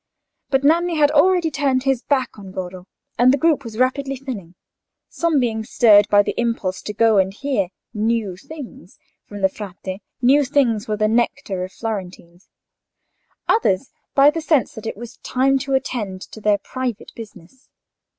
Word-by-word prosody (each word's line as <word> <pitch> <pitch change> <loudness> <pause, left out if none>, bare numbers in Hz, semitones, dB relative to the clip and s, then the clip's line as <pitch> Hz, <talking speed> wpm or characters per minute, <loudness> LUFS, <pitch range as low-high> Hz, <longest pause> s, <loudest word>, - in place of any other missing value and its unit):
But 270 0 +1
Nanni 335 +3 +3
had 295 -1 +4
already 340 +2 +3
turned 270 -3 0
his 270 -3 +1
back 260 -6 -1
on 195 -2 -10
Goro, 185 0 -7 0.3
and 250 +1 +6
the 275 - +2
group 300 -1 +2
was 225 -3 -8
rapidly 270 +2 0
thinning; 230 -10 -7 0.5
some 335 -4 +1
being 225 -3 -1
stirred 210 -2 +5
by 205 0 +5
the - - -2
impulse 215 -6 -2
to 210 - -6
go 225 -2 +4
and 190 0 +2
hear 220 -3 -1 0.3
"new 220 -3 -1
things" 245 - -11 0.3
from 205 -1 -8
the 190 - +5
Frate 190 0 -8 0.2
("new 270 +4 +4
things" 250 -5 +1
were 215 -1 -1
the 215 0 +2
nectar 215 -4 0
of 185 - -6
Florentines); 185 -5 -7 1.0
others 260 - +1 0.2
by 280 +1 +7
the 325 +1 -4
sense 305 -2 +1
that 225 -3 -8
it 220 - -5
was 235 +1 -10
time 270 +1 +1
to 270 0 -1
attend 210 -8 -3
to 220 - -11
their 210 -1 +3
private 250 -1 -5
business. 215 +2 -13
235 Hz, 170 wpm, -21 LUFS, 205-275 Hz, 1.0 s, by